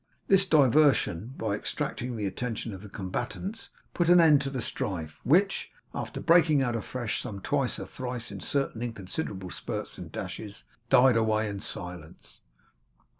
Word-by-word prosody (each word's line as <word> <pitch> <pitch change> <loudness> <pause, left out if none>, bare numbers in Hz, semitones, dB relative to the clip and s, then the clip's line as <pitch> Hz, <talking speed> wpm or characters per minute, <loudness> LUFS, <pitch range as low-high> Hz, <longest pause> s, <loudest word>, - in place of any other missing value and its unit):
This 195 0 +5
diversion, 135 - +4
by - - -1
distracting 125 0 -3
the 105 - -2
attention 115 +2 -3
of 95 - -8
the 105 - -10
combatants, 120 - -5 0.2
put 175 -1 +1
an 175 0 +8
end 155 -4 +6
to 140 - -2
the 135 -2 -4
strife, 80 -9 -4
which, 190 +9 +3 0.2
after - - -4
breaking 160 -4 +5
out 120 -2 0
afresh 115 0 -3
some 100 -2 -6
twice 135 +4 0
or - - -5
thrice 125 -3 -6
in 100 - -6
certain 135 -1 -2
inconsiderable 100 - -4
spurts - - -5
and - - -8
dashes, 105 -1 -6 0.3
died 125 -1 +6
away 110 -1 +2
in 100 -1 -4
silence. 90 -5 -9
120 Hz, 155 wpm, -28 LUFS, 100-145 Hz, 0.3 s, an